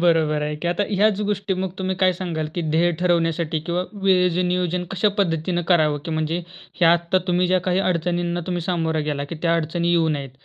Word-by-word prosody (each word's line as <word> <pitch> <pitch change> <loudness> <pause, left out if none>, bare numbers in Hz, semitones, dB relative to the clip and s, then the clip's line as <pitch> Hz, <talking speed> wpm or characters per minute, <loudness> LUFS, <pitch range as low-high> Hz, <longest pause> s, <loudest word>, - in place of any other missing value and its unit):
बरोबर 160 -3 +2
आहे 150 0 -2
की. 170 +3 -3
आता 175 +4 0
ह्याच 205 0 +2
गोष्टी 200 -1 -1
मग 185 0 -2
तुम्ही 190 0 -1
काय 185 -1 +3
सांगाल, 165 -4 -4
की 175 - -2
ध्येय 170 +3 +3
ठरवण्यासाठी 165 -2 +1
किंवा 175 +1 -1 0.2
वेळेचं 180 -2 +3
नियोजन 180 0 -1
कश्या 195 +2 +1
पद्धतीने 175 -1 0
करावं, 155 -5 +3
की - - -5
म्हणजे 155 +1 -1 0.4
हे - - +5
आत्ता 170 +2 +3
तुम्ही 180 0 +2
ज्या 185 +1 +3
काही 180 0 +2
अडचणींना 175 0 -1
सामोरे 160 -2 -1
गेला, 145 -1 -2
की 155 - -7
त्या 170 -1 +2
अडचणी 170 +2 -1
येऊ 165 -2 +3
नयेत, 140 -3 -3
175 Hz, 195 wpm, -22 LUFS, 160-180 Hz, 0.4 s, हे